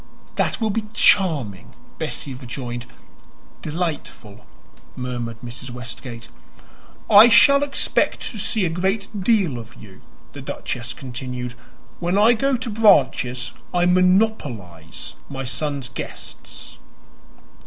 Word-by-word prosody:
"That -, -, 0 dB
will 220 Hz, -2 st, +1 dB
be 220 Hz, +1 st, -2 dB
charming!" 145 Hz, -, +2 dB, 0.2 s
Bessie 135 Hz, -, -3 dB
rejoined. 120 Hz, -1 st, -6 dB, 0.7 s
"Delightful!" 150 Hz, -, -5 dB, 0.5 s
murmured 120 Hz, -2 st, -4 dB
Mrs. 120 Hz, +2 st, -7 dB
Westgate. 120 Hz, 0 st, -7 dB, 0.8 s
"I 215 Hz, +3 st, +9 dB
shall 280 Hz, +4 st, +7 dB
expect 285 Hz, -1 st, +1 dB
to 220 Hz, -, -7 dB
see 205 Hz, 0 st, +1 dB
a -, -, +1 dB
great 190 Hz, +5 st, -1 dB
deal 185 Hz, -, +2 dB
of 115 Hz, +1 st, -11 dB
you," 95 Hz, -4 st, -14 dB, 0.3 s
the -, -, -8 dB
duchess 120 Hz, 0 st, -5 dB
continued. 125 Hz, -1 st, -6 dB, 0.5 s
"When 175 Hz, +2 st, 0 dB
I 220 Hz, +4 st, +6 dB
go 270 Hz, +3 st, +1 dB
to 245 Hz, 0 st, -5 dB
Branches 190 Hz, -, +3 dB, 0.2 s
I 175 Hz, 0 st, +3 dB
monopolize 180 Hz, -, 0 dB, 0.2 s
my 135 Hz, -1 st, -5 dB
son's 140 Hz, +1 st, -2 dB
guests." 135 Hz, -, -8 dB
140 Hz, 110 wpm, -22 LUFS, 120-205 Hz, 0.8 s, I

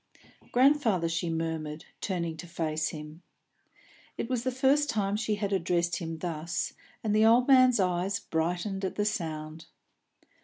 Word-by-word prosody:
"Grandfather," 245 Hz, -, +3 dB
she 165 Hz, +1 st, -1 dB
murmured, 160 Hz, -2 st, -3 dB, 0.2 s
turning 170 Hz, -5 st, -2 dB
to 170 Hz, +2 st, -9 dB
face 155 Hz, -2 st, -1 dB
him. 150 Hz, +1 st, -9 dB, 1.0 s
It 230 Hz, -, -3 dB
was 250 Hz, -3 st, 0 dB
the 260 Hz, -, +1 dB
first 275 Hz, +3 st, +2 dB
time 200 Hz, -3 st, 0 dB
she 215 Hz, 0 st, 0 dB
had 205 Hz, -1 st, -2 dB
addressed 175 Hz, -2 st, +1 dB
him 165 Hz, -1 st, -5 dB
thus, 165 Hz, -1 st, -3 dB, 0.3 s
and 215 Hz, -1 st, +1 dB
the 215 Hz, +1 st, +5 dB
old 240 Hz, +2 st, +5 dB
man's 255 Hz, -3 st, +6 dB
eyes 185 Hz, +1 st, 0 dB
brightened 180 Hz, +5 st, -2 dB
at 190 Hz, -, -2 dB
the 205 Hz, -, 0 dB
sound. 160 Hz, -5 st, -4 dB
180 Hz, 150 wpm, -29 LUFS, 165-215 Hz, 1.0 s, man's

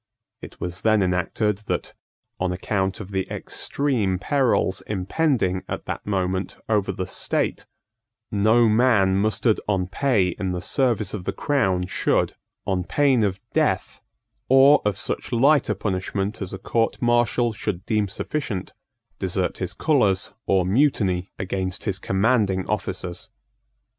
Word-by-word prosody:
It -, -, -11 dB
was 90 Hz, +1 st, -4 dB
then 110 Hz, -2 st, +3 dB
enacted 95 Hz, +3 st, 0 dB
that, -, -, -2 dB, 0.5 s
on 95 Hz, -1 st, 0 dB
account 95 Hz, +1 st, -1 dB
of 100 Hz, -2 st, -8 dB
the 95 Hz, -1 st, -2 dB
extreme 120 Hz, -10 st, -1 dB
perils 120 Hz, -4 st, +1 dB
impending 100 Hz, -, 0 dB
at -, -, -5 dB
that -, -, -5 dB
moment 95 Hz, -1 st, -1 dB
over 105 Hz, -3 st, +1 dB
the 95 Hz, 0 st, -4 dB
state, -, -, -2 dB, 0.6 s
no 110 Hz, +3 st, +4 dB
man 110 Hz, -4 st, +3 dB
mustered 110 Hz, +2 st, +1 dB
on 95 Hz, -3 st, +1 dB
pay 100 Hz, -1 st, +1 dB
in 90 Hz, +1 st, -3 dB
the 90 Hz, -, -2 dB
service 115 Hz, -3 st, 0 dB
of 95 Hz, -4 st, -5 dB
the -, -, 0 dB
crown 95 Hz, -11 st, 0 dB
should, 90 Hz, -, 0 dB, 0.3 s
on 95 Hz, -2 st, 0 dB
pain 135 Hz, +3 st, +2 dB
of 95 Hz, -2 st, 0 dB
death, -, -, 0 dB, 0.5 s
or 135 Hz, +3 st, +7 dB
of 105 Hz, -2 st, +1 dB
such -, -, -4 dB
lighter 130 Hz, -2 st, +3 dB
punishment 95 Hz, +2 st, -2 dB
as 95 Hz, -, -4 dB
a 95 Hz, -, -5 dB
court 115 Hz, +4 st, 0 dB
martial 120 Hz, -1 st, +2 dB
should 95 Hz, -3 st, -4 dB
deem 105 Hz, -2 st, +1 dB
sufficient, 105 Hz, 0 st, -4 dB, 0.5 s
desert -, -, -1 dB
his -, -, -3 dB
colours 105 Hz, -11 st, +2 dB
or 95 Hz, -2 st, +3 dB
mutiny 95 Hz, -5 st, +1 dB
against 95 Hz, 0 st, -3 dB
his 100 Hz, -3 st, -1 dB
commanding 95 Hz, -1 st, +1 dB
officers. 95 Hz, -4 st, -4 dB
100 Hz, 140 wpm, -23 LUFS, 95-115 Hz, 0.6 s, or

